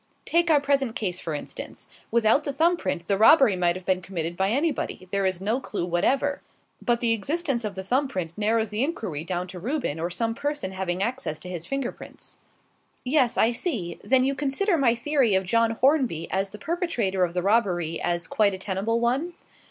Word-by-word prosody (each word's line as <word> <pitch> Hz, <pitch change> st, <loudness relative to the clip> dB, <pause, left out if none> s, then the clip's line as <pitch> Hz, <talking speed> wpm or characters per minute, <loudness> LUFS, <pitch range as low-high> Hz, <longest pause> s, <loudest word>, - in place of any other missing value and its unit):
Take 340 Hz, +1 st, +2 dB
our 305 Hz, -2 st, +6 dB
present 275 Hz, -4 st, 0 dB
case, 185 Hz, -7 st, -2 dB
for 160 Hz, -, -4 dB
instance. -, -, -7 dB, 0.2 s
Without 230 Hz, +5 st, +3 dB
the 285 Hz, -, -2 dB
thumb 330 Hz, +6 st, +3 dB
print, 170 Hz, -, -3 dB
the 200 Hz, +1 st, 0 dB
robbery 255 Hz, -2 st, +7 dB
might 175 Hz, -1 st, +1 dB
have 185 Hz, -1 st, -8 dB
been 185 Hz, -1 st, +1 dB
committed 170 Hz, -2 st, -4 dB
by 190 Hz, +2 st, +1 dB
anybody; 275 Hz, -, -1 dB
there 200 Hz, -1 st, +1 dB
is 185 Hz, -2 st, -1 dB
no 215 Hz, +6 st, 0 dB
clue 205 Hz, -9 st, -4 dB
whatever. 265 Hz, +12 st, +1 dB, 0.4 s
But 235 Hz, -1 st, +1 dB
the 230 Hz, -1 st, +3 dB
existence 275 Hz, -, -1 dB
of 210 Hz, -3 st, -4 dB
the 190 Hz, -, -5 dB
thumb 260 Hz, +8 st, +1 dB
print 180 Hz, -9 st, -4 dB
narrows 220 Hz, 0 st, +1 dB
the 215 Hz, +4 st, 0 dB
inquiry 220 Hz, -, -3 dB
down 180 Hz, +1 st, -3 dB
to 180 Hz, 0 st, -8 dB
Reuben 240 Hz, -, -2 dB
or 170 Hz, +2 st, -1 dB
some 225 Hz, +5 st, -1 dB
person 290 Hz, -6 st, -3 dB
having 190 Hz, -1 st, -2 dB
access 235 Hz, -9 st, -3 dB
to 180 Hz, -, -8 dB
his 175 Hz, -2 st, -5 dB
finger 275 Hz, -2 st, -2 dB
prints." -, -, -14 dB, 0.6 s
"Yes, 255 Hz, -2 st, +2 dB
I 225 Hz, -, +4 dB
see. 230 Hz, -, -3 dB
Then 260 Hz, 0 st, +3 dB
you 270 Hz, +1 st, +1 dB
consider 290 Hz, +8 st, +1 dB
my 260 Hz, -6 st, +3 dB
theory 255 Hz, -4 st, +2 dB
of 190 Hz, -, +2 dB
John 230 Hz, +5 st, +2 dB
Hornby 245 Hz, -, +1 dB
as 195 Hz, +1 st, 0 dB
the 210 Hz, -, -10 dB
perpetrator 245 Hz, -, -1 dB
of 175 Hz, 0 st, -1 dB
the 180 Hz, -, 0 dB
robbery 180 Hz, -6 st, +1 dB
as 175 Hz, -1 st, -1 dB
quite 205 Hz, -3 st, +2 dB
a -, -, -7 dB
tenable 200 Hz, +4 st, -1 dB
one?" 265 Hz, +9 st, 0 dB
225 Hz, 205 wpm, -25 LUFS, 185-275 Hz, 0.6 s, robbery